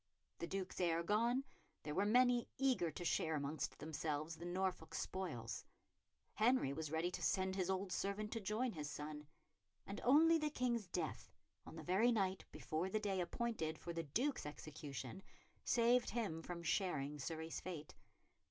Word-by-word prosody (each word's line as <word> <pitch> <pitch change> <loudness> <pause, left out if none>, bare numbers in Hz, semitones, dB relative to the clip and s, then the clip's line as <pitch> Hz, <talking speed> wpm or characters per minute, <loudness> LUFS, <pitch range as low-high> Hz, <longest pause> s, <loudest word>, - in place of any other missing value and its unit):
The 170 - -2
Duke's 185 0 -3
heir 170 -1 +2
gone, 235 +7 +2 0.4
there 150 - -3
were 200 +5 +2
many 245 +1 +5
eager 255 -10 +3
to 175 +3 -6
share 160 -1 +2
amongst 145 +1 -2
themselves 155 +1 -2
the 170 - -7
Norfolk 180 -2 -1
spoils; 120 -13 -3 0.7
Henry 220 - +3
was 155 +1 -3
ready 160 +3 0
to - - -4
send 190 0 +2
his 190 -1 0
old 190 0 0
servant 205 +3 -1
to 225 - -1
join 220 +5 0
his 150 -6 -4
son; 150 0 -5 0.6
and 200 - -5
only 320 +6 +7
the 305 -1 +1
King's 240 -7 0
death, 170 -3 -3 0.4
on - - -8
the 160 - -6
very 195 +9 +4
night 195 -4 +1
before 165 +4 -2
the 215 - +1
day 195 -3 0
appointed 175 -5 -1
for 170 +3 -5
the 165 - -1
Duke's 225 - 0
execution, 150 0 -6 0.4
saved 240 +1 +4
him 205 -9 -1
from 170 0 -5
sharing 155 -5 0
Surrey's 160 +3 -3
fate. 165 -5 -6
180 Hz, 160 wpm, -40 LUFS, 155-215 Hz, 0.7 s, only